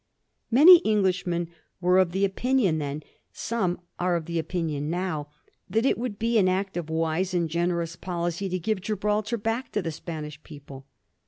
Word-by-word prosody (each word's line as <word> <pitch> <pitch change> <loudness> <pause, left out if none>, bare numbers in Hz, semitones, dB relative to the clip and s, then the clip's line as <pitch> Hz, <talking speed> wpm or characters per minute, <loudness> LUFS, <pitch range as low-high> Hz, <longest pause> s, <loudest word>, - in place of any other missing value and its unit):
Many 320 +9 +9
Englishmen 180 -5 +1 0.3
were 180 +1 +4
of 185 -1 +1
opinion 200 -1 +1
then, 145 +1 -4 0.3
some 190 -7 -2 0.2
are 180 0 +1
of 165 -2 -3
opinion 160 -3 -2
now, 170 -4 -2 0.4
that 225 +6 +1
it - - +3
would 235 -3 -4
be 230 +1 +2
an 190 - +4
act 190 +1 -1
of 170 -3 -4
wise 165 +3 -1
and 170 -1 +1
generous 170 0 -1
policy 175 +2 -3
to 185 - -1
give 190 +2 -2
Gibraltar 210 +3 -1
back 225 +4 -2
to 210 - 0
the 165 - -2
Spanish 155 -2 -7
people. 140 -3 -12
180 Hz, 160 wpm, -26 LUFS, 165-210 Hz, 0.4 s, Many